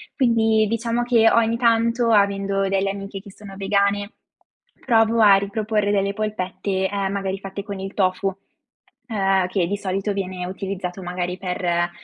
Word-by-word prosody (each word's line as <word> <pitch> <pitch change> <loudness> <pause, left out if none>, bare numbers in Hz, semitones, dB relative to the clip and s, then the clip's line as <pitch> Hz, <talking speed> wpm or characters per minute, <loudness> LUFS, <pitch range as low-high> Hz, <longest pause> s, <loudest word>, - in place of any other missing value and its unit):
Quindi 225 -4 +3
diciamo, 230 +1 -1
che 235 -2 +4
ogni 230 0 +2
tanto, 230 0 +2
avendo 200 -1 +2
delle 195 0 +1
amiche 195 0 -7
che 200 +1 -13
sono 195 0 -12
vegane, 200 +1 0 0.7
provo 225 -2 +3
a 205 -2 +8
riproporre 205 +1 -1
delle 200 -1 +1
polpette, 190 -2 -2
ehm, 200 -1 -2
magari 195 -1 -3
fatte 195 +1 -7
con 200 -2 -6
il 195 +1 -6
tofu, 190 0 +1 0.8
ehm, 195 -4 +1
che 185 -1 0
di 205 +3 -2
solito 195 +1 -2
viene 185 -2 -4
utilizzato 190 0 -5
magari 180 0 -3
per, 175 -2 -1
200 Hz, 150 wpm, -22 LUFS, 190-215 Hz, 0.8 s, a